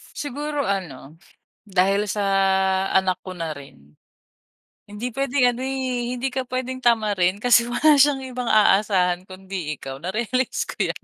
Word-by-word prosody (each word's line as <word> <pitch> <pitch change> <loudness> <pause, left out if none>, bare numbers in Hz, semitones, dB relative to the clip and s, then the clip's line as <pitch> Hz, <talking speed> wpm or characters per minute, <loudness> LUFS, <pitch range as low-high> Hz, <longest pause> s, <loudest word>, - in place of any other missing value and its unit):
Siguro 290 +1 -3
ano, 160 -7 -4 0.5
dahil 195 +2 +1
sa 205 +1 -2 0.7
anak 190 -1 +2
ko 185 -1 -7
na 165 -2 -4
rin. 75 - -13 0.9
Hindi 220 +4 -5
puwedeng 270 -1 +2
ano, 240 - -7
eh, 260 -2 -2
hindi 260 +1 -3
ka 260 -1 -3
pwedeng 255 0 -4
tamarin 210 -6 +2
kasi 240 +2 +5
wala 305 +5 +4
siyang 280 -1 +3
ibang 250 -2 -4
aasahan 195 -4 +3
kundi 185 -5 -6
ikaw, 135 +1 -8
narealize 235 +8 -1
ko - - -2
yan. - - -6
215 Hz, 140 wpm, -22 LUFS, 185-255 Hz, 0.9 s, kasi